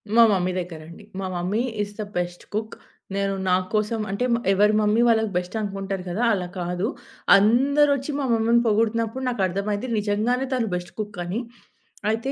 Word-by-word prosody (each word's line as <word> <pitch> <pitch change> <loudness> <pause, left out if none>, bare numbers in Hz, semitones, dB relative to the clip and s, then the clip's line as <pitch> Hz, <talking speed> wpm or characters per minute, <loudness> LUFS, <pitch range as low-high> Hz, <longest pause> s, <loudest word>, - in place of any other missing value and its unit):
మా 235 - +8
మమ్మీ 185 -2 +1
దగ్గరండి. 170 +1 -8 0.2
మా 195 - -3
mummy 185 +6 0 0.2
is 205 0 -4
the - - -1
best 175 0 -3
cook. 220 +1 -3 0.4
నేను 195 0 0
నా 180 - +4 0.2
కోసం, 215 +1 0
అంటే 225 +5 -1
మా 235 - +2
ఎవరి 210 +2 +4
మమ్మీ 210 +2 +3
వాళ్ళకి 220 -2 +3
బెస్ట్ 180 +4 -4
అనుకుంటారు 195 -2 -4
గదా! 210 +8 -1
అలా 180 -3 -2
కాదు. 180 +4 -1 0.5
అందరొచ్చి 280 +6 +3
మా 280 - -1
మమ్మీని 230 +1 +3
పొగుడుతున్నప్పుడు 225 +3 +1
నాకు 240 -5 -2
అర్థమైంది, 205 +5 -2
నిజంగానే 220 +5 0
తను 245 -3 0
బెస్ట్ 180 0 -5
కుక్ 210 -2 -5
అని. 190 +7 -2 0.7
అయితే 230 +5 -2
210 Hz, 165 wpm, -24 LUFS, 190-230 Hz, 0.7 s, మా